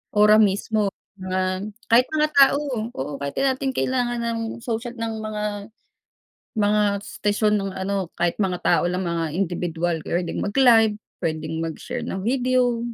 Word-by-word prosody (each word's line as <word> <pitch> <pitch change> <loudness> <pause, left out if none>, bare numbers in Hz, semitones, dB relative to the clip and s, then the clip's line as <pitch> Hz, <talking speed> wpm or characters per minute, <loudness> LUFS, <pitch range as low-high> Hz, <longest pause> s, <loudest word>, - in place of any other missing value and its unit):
ora 210 +1 +6
mismo, 210 +1 +2 0.3
mga 185 +1 -2 0.2
kahit 245 +2 +6
mga 305 -1 +1
tao. 280 +1 +6 0.4
Oo 140 +1 -4
kahit 140 0 -4
'di - - 0
natin 265 0 0
kailangan 245 -2 0
ng 230 - -3 0.2
social 235 +1 -3
ng 230 -1 -3
mga, 215 -1 -4 1.1
mga 210 0 +3 0.2
station 210 0 0
nung 195 -1 -4
ano, 190 -1 -2
kahit 175 +2 -1
mga 185 -3 -1
tao 175 - +3
lang 180 +1 -1
mga 165 -2 -2
indibidwal 175 -2 -1
p'wedeng 175 0 -1
mag-live, 225 -1 +4 0.2
p'wedeng 160 -1 -3
mag-share 165 -1 -4
ng 190 0 -4
video, 250 0 +1
205 Hz, 145 wpm, -23 LUFS, 175-230 Hz, 1.1 s, ora